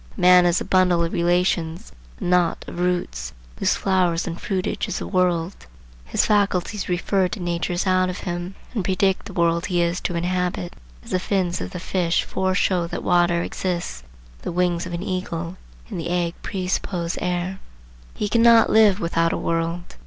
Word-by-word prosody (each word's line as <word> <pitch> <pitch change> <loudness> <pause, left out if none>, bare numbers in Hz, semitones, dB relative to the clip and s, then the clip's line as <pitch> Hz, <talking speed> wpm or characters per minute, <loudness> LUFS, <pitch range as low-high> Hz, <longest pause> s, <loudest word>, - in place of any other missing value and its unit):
A - - -8
man 180 0 +7
is 175 +1 +2
a - - -5
bundle 180 -2 +3
of 165 - -2
relations, 175 -1 0 0.3
a - - -6
knot 180 -1 +1
of 175 - -7
roots, 65 - -1 0.3
whose - - +2
flower 185 -3 +2
and 170 0 -5
fruitage 190 -2 -2
is - - -3
the - - -4
world. 180 -1 +1 0.5
His 65 - +1
faculties 205 -1 +1
refer 185 +1 +1
to 190 - -6
natures 175 +1 -1
out 185 -1 +2
of 180 - -4
him 175 +1 -4 0.2
and 215 -6 -1
predict 190 +1 +1
the 200 - -9
world 170 -1 +1
he 180 -1 0
is 170 +1 -1
to 175 - -2
inhabit, 180 0 -1 0.3
as - - -10
the 185 - +2
fins 185 -2 -1
of - - -4
the 180 - -6
fish 175 -1 0
foreshow 185 -2 0
that - - -5
water 175 -1 +3
exists, 175 - -3 0.4
or - - -20
the - - -2
wings 175 0 0
of 175 - -7
an 170 +2 -3
eagle 180 -2 -4 0.3
in - - -5
the 165 +1 -4
egg 175 -1 0
presuppose 180 -2 -2
air. 180 +1 -2 0.6
He 210 - -1
cannot 230 +1 +5
live 215 -3 +5
without 165 -2 +1
a - - -1
world. 165 +1 -2
180 Hz, 180 wpm, -23 LUFS, 170-185 Hz, 0.6 s, man